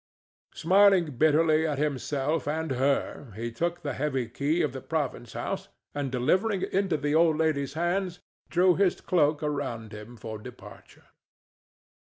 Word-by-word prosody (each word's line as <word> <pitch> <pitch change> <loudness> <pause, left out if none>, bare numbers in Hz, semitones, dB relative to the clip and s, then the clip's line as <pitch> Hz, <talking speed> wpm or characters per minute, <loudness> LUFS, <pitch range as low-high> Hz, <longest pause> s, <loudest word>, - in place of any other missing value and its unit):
Smiling 180 -6 +4
bitterly 155 +1 +4
at 150 -3 -2
himself 145 +1 -1
and 160 0 -2
her, 135 -1 -1
he 115 +2 -4
took 170 +8 -2
the 145 - -2
heavy 135 -4 -1
key 145 +8 0
of 145 -5 -1
the 130 - -6
province 135 -7 -3
house, - - -4 0.2
and, 145 -2 -3
delivering 185 - +1
it - - -4
into 190 -4 +1
the 145 0 -1
old 160 -1 +4
lady's 155 -4 0
hands, 175 +2 -1 0.3
drew 180 +1 +4
his 195 0 +2
cloak 155 -3 +1
around 135 -7 -3
him 105 +3 -10
for 110 0 -7
departure. - - -13
150 Hz, 150 wpm, -27 LUFS, 135-170 Hz, 0.3 s, Smiling